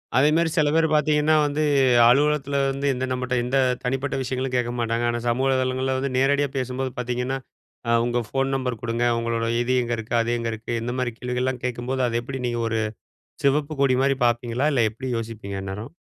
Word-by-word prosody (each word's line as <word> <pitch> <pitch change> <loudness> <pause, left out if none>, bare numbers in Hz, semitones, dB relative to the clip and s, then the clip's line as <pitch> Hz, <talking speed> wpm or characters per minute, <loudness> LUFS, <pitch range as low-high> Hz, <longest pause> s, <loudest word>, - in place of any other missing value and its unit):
அதே 135 +3 +5
மாரி 165 0 +2
சில 150 -1 +4
பேர் 165 0 +4
பார்த்தீங்கன்னா 150 +1 +3
வந்து, 145 +1 0 0.5
அலுவலகத்தில 140 +1 +2
வந்து, 135 +1 -2
இந்த 130 +1 -2
நம்மட்ட 125 0 -2
எந்த 130 +3 0 0.3
தனிப்பட்ட 135 +2 -1
விஷயங்களும் 130 0 -3
கேட்க 120 -1 0
மாட்டாங்க. 115 0 0
ஆனா 120 0 -1
சமூக 125 +3 +1
வலைதளங்கள்ள 130 0 0
வந்து, 135 0 -2
நேரடியா 140 +2 +3
பேசும்போது 130 +1 -2
பார்த்தீங்கன்னா, 125 +2 -2 0.5
அ, - - 0 0.2
உங்க 120 0 0
ஃபோன் 135 +2 0
நம்பர் 125 -3 -2
குடுங்க, 115 +1 -1 0.2
உங்களோட 115 0 -1
இது 125 +1 0
எங்க 120 0 -2
இருக்கு, 115 +1 -4
அது 115 +1 -1
எங்க 115 0 -2
இருக்கு, 115 +2 -5
இந்த 120 +1 -3
மாதிரி 120 -2 -1
கேள்விகள்லாம் 125 0 -2
கேக்கும்போது, 125 +1 -2
அதை 120 0 0
எப்படி 135 +2 -5
நீங்க 120 -1 -2
ஒரு 110 - 0 0.7
சிவப்பு 150 +2 +1
கொடி 130 -2 +3
மாரி 135 0 +2
பாப்பீங்களா? 120 +3 0
இல்லை 120 -4 +3
எப்புடி 130 +4 -6
யோசிப்பீங்க 110 -3 -6
அந்நேரம்? 105 +7 -6
130 Hz, 185 wpm, -24 LUFS, 120-135 Hz, 0.7 s, அதே